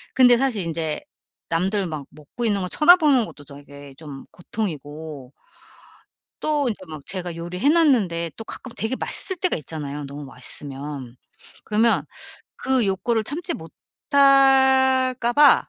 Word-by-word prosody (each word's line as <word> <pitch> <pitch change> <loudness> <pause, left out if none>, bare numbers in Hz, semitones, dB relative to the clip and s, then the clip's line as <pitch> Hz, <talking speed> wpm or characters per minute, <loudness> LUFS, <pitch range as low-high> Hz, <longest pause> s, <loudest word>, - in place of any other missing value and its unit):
근데 245 -2 +6
사실 245 -6 0
인제 160 -2 -3 0.5
남들 190 +3 0
막 150 -4 -6
먹고 155 +11 -7
있는 205 -3 +1
거 180 - -3
쳐다보는 300 - +5
것도 145 - -12
되게 140 -1 -12
좀 145 -3 -10
고통이고 155 - -6 1.1
또 295 -3 0
인제 215 - -4
막 155 -3 -9
제가 180 -3 -5
요리 170 +2 -6
해 270 - +2
놨는데 220 - +2
또 225 - -8
가끔 255 +2 -8
되게 225 +4 -2
맛있을 375 - +1
때가 365 +1 0
있잖아요 150 -1 -6
너무 140 +1 -8
맛있으면. 135 -2 -7 0.5
그러면 220 +2 +2 0.5
그 260 -4 +1
욕구를 215 +4 0
참지 310 +8 -3
못할까 265 - +3
봐 290 -1 +5
195 Hz, 275 characters per minute, -22 LUFS, -, 1.1 s, 근데